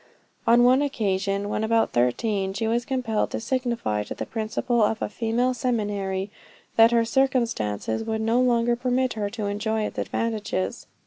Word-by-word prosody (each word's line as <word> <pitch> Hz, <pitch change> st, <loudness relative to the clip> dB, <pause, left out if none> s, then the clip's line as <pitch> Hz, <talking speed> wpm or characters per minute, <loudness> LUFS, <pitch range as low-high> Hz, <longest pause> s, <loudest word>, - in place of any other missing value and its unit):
On 240 Hz, +1 st, +6 dB
one 255 Hz, +3 st, +5 dB
occasion, 200 Hz, -7 st, -1 dB
when 215 Hz, -, -2 dB
about 225 Hz, 0 st, +2 dB
thirteen, 190 Hz, -, 0 dB
she 225 Hz, +3 st, -2 dB
was 235 Hz, +2 st, 0 dB
compelled 250 Hz, -5 st, -1 dB
to -, -, -3 dB
signify 235 Hz, -, -1 dB
to -, -, -6 dB
the -, -, -4 dB
principal 225 Hz, +2 st, -1 dB
of 215 Hz, +1 st, +2 dB
a -, -, -1 dB
female 235 Hz, +4 st, 0 dB
seminary, 205 Hz, -5 st, -2 dB, 0.4 s
that 225 Hz, 0 st, +7 dB
her 235 Hz, -1 st, +3 dB
circumstances 230 Hz, -, 0 dB
would 220 Hz, 0 st, -2 dB
no 230 Hz, +3 st, +2 dB
longer 240 Hz, -1 st, +2 dB
permit 255 Hz, +1 st, 0 dB
her 210 Hz, -2 st, -2 dB
to 215 Hz, 0 st, -4 dB
enjoy 215 Hz, +2 st, -1 dB
its -, -, -4 dB
advantages. 210 Hz, -, -2 dB
225 Hz, 165 wpm, -25 LUFS, 205-240 Hz, 0.4 s, that